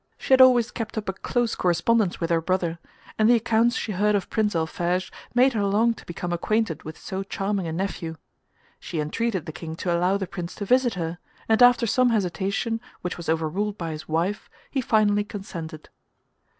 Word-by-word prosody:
She - - 0
had 260 - +7
always 245 -2 +6
kept 225 -2 -5
up 210 - -3
a - - -1
close 240 +4 -1
correspondence 190 +3 +1
with 165 0 -2
her 165 -1 +3
brother, 170 -1 -1 0.4
and 215 +1 +5
the 245 - +7
accounts 230 +1 +2
she 220 - -2
heard 210 +2 +2
of 195 - -2
Prince 210 -4 +1
Alphege 175 +3 -1 0.2
made 255 +2 +5
her 210 -3 0
long 215 +4 +3
to - - -14
become 175 0 -4
acquainted 180 -2 0
with 155 +1 -9
so 190 0 -5
charming 195 -1 -2
a - - -3
nephew. 165 -2 -3 0.6
She 165 - -5
entreated 185 +4 -1
the - - -5
King 160 -1 -7
to 175 +1 -1
allow 180 +3 +2
the 195 - -3
Prince 175 -1 -6
to 205 - -5
visit 250 0 +3
her, 170 0 -4 0.3
and 220 +2 +3
after 245 -1 +6
some 250 +3 +3
hesitation 200 +2 -1 0.2
which 180 - -3
was 170 - -7
overruled 170 +6 -1
by 165 -2 -4
his 155 0 -7
wife, 170 +6 -1 0.2
he 270 - 0
finally 210 -3 +3
consented. 170 -7 -8
195 Hz, 195 wpm, -25 LUFS, 170-225 Hz, 0.6 s, had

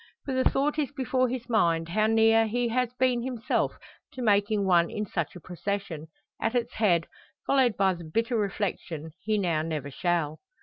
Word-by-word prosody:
For 270 - -2
the 260 0 +3
thought 290 +3 0
is 290 -2 -1
before 260 -2 0
his 245 -1 -4
mind, 170 -8 +2
how 215 +4 +2
near 225 0 +4
he 240 +2 0
has 250 0 0
been 250 -1 +1
himself 245 -1 -1 0.4
to 255 - -5
making 205 -1 +2
one 170 -2 +4
in 210 - -3
such 170 -4 -3
a - - -8
procession 180 -2 -4 0.3
at 225 +2 0
its 240 0 0
head 175 -7 +2 0.4
followed 260 -5 +3
by 195 -1 +3
the 175 -1 -9
bitter 230 +10 -1
reflection, 190 -6 -2
he 215 +1 0
now 170 -6 +1
never 155 -3 -4
shall. 165 -1 -1
215 Hz, 180 wpm, -27 LUFS, 175-245 Hz, 0.4 s, near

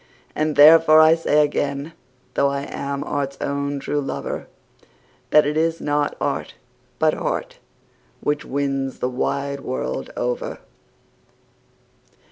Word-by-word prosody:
And 155 -1 0
therefore 155 +1 +8
I 155 0 +7
say 150 -2 +3
again, 145 +1 -3 0.4
though 140 - +2
I 140 0 -2
am 140 0 -4
art's 140 -1 -3
own 140 0 -2
true 145 +1 -2
lover, 135 - -5 0.8
That 150 - +5
it 150 +1 -1
is 165 +1 +1
not 145 0 -1
art, - - -3 0.4
but - - +3
heart, - - -3 0.6
which 145 0 -1
wins 135 -1 -2
the 125 - -1
wide 140 +2 -2
world 130 -1 -4
over. - - -2
145 Hz, 120 wpm, -22 LUFS, 140-155 Hz, 0.8 s, therefore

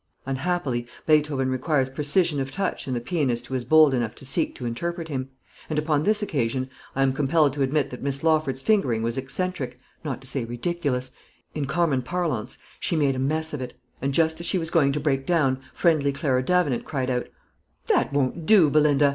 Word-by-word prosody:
Unhappily, 135 -3 -1 0.2
Beethoven 150 -4 +2
requires 130 +1 +1
precision 150 +3 +1
of 135 0 -2
touch 185 +4 -3
in 130 - -1
the - - 0
pianist 125 -3 -1
who 130 - -8
is 130 -2 -1
bold 155 +2 +6
enough 120 -4 -1
to - - -12
seek 135 - 0
to 125 - -7
interpret 165 +8 -3
him; 135 -2 -3 0.4
and 155 - -2
upon 150 -1 +1
this 210 +5 +2
occasion 130 - -1 0.2
I 135 - +2
am 135 -1 +2
compelled 145 +1 +2
to 145 - -4
admit 140 +1 +1
that 125 - -8
Miss 140 +1 -2
Lawford's 155 -5 +1
fingering 130 - +2
was 115 0 -1
eccentric, 135 -1 -3 0.3
not 135 -6 -3
to - - -14
say 135 -1 -2
ridiculous, 130 +1 -2 0.4
in 145 -3 -2
common 150 -3 +1
parlance, 155 -5 -2 0.2
she - - -1
made 140 -4 +2
a - - -3
mess 155 +4 -1
of 145 - -3
it; 125 -1 -6 0.3
and 135 +2 0
just 160 +2 +2
as 170 - -3
she 185 - +1
was 165 -1 -2
going 145 -5 +4
to 145 - -1
break 135 -2 0
down, 135 -6 +1
friendly 155 -5 +2
Clara 135 -2 0
Davenant 150 -4 +1
cried 130 -4 -2
out, 125 -1 -1 0.6
"That - - +2
won't 145 +4 -1
do, 190 -9 +6
Belinda! 150 -1 +4
140 Hz, 200 wpm, -25 LUFS, 130-160 Hz, 0.6 s, bold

